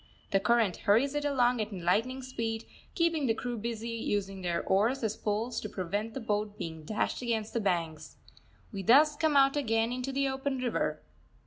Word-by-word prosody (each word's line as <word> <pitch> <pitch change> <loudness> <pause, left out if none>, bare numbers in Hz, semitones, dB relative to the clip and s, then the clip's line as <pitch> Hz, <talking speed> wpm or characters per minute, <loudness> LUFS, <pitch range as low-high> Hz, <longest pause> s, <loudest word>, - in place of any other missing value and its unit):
The 195 - +4
current 225 -3 +2
hurries 240 +8 +3
it 295 0 -1
along 250 -4 +2
at 215 +1 -4
lightning 210 +8 0
speed, 230 -3 -3 0.3
keeping 330 -5 +1
the 225 - +2
crew 245 0 -4
busy 230 +1 -4
using 205 -4 -2
their 175 -2 -1
oars 225 +7 +2
as 220 -1 0
poles 220 +3 -2
to 215 - -5
prevent 205 +5 -3
the - - -2
boat 210 -2 -2
being 160 -1 -6
dashed 210 +10 -2
against 225 -3 -2
the 230 - 0
banks. 165 -5 -2 0.6
We 200 -3 -4
thus 290 - +6
come 300 -1 +2
out 275 0 +5
again 225 -4 +1
into 255 +2 -3
the 275 +1 +1
open 265 0 -2
river. 250 -2 -1
225 Hz, 185 wpm, -30 LUFS, 205-260 Hz, 0.6 s, thus